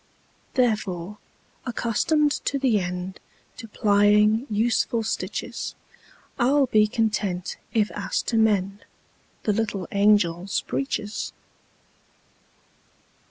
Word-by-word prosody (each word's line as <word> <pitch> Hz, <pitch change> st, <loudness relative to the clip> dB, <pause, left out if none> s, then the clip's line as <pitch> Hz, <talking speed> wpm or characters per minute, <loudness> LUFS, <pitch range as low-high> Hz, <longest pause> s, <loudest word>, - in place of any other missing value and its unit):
Therefore, 210 Hz, -5 st, 0 dB, 0.4 s
accustomed 275 Hz, +5 st, +1 dB
to 280 Hz, -, 0 dB
the 260 Hz, -5 st, +2 dB
endTo 185 Hz, +4 st, -7 dB
plying 210 Hz, +4 st, +3 dB
useful 225 Hz, +1 st, +1 dB
stitches,I 240 Hz, +2 st, -5 dB
'll 285 Hz, 0 st, +4 dB
be 215 Hz, -3 st, +3 dB
content 210 Hz, -5 st, -1 dB
if 215 Hz, -2 st, +1 dB
asked 205 Hz, -, -3 dB
to 235 Hz, -, -1 dB
mendThe 205 Hz, -3 st, +2 dB, 0.7 s
little 205 Hz, -4 st, -2 dB
angels' 200 Hz, -3 st, +2 dB
breeches. 215 Hz, -6 st, -3 dB
210 Hz, 80 wpm, -24 LUFS, 200-230 Hz, 0.7 s, ll